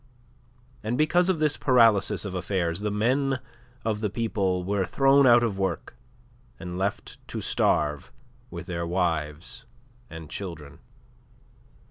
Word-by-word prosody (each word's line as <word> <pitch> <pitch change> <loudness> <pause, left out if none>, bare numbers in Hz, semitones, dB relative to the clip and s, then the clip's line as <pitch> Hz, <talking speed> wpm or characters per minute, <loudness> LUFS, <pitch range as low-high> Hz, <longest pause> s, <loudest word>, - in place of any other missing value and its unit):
And 115 +3 -1
because 175 +5 +3
of 185 - +2
this 150 -2 +1
paralysis 110 -6 +3
of 100 - -5
affairs 90 -2 -1
the 105 +1 -2
men 130 +6 +1 0.5
of 110 -2 0
the 105 -1 -1
people 100 -4 -1
were 100 +1 0
thrown 135 +8 +4
out 120 0 +6
of 105 -4 -1
work 95 -9 -3 0.6
and 90 -2 -6
left 95 +2 -3
to - - -5
starve 75 - 0 0.4
with - - -7
their 85 -2 -3
wives 85 +6 -2 0.4
and 80 -1 -9
children. 75 -6 -8
100 Hz, 130 wpm, -26 LUFS, 90-120 Hz, 0.6 s, out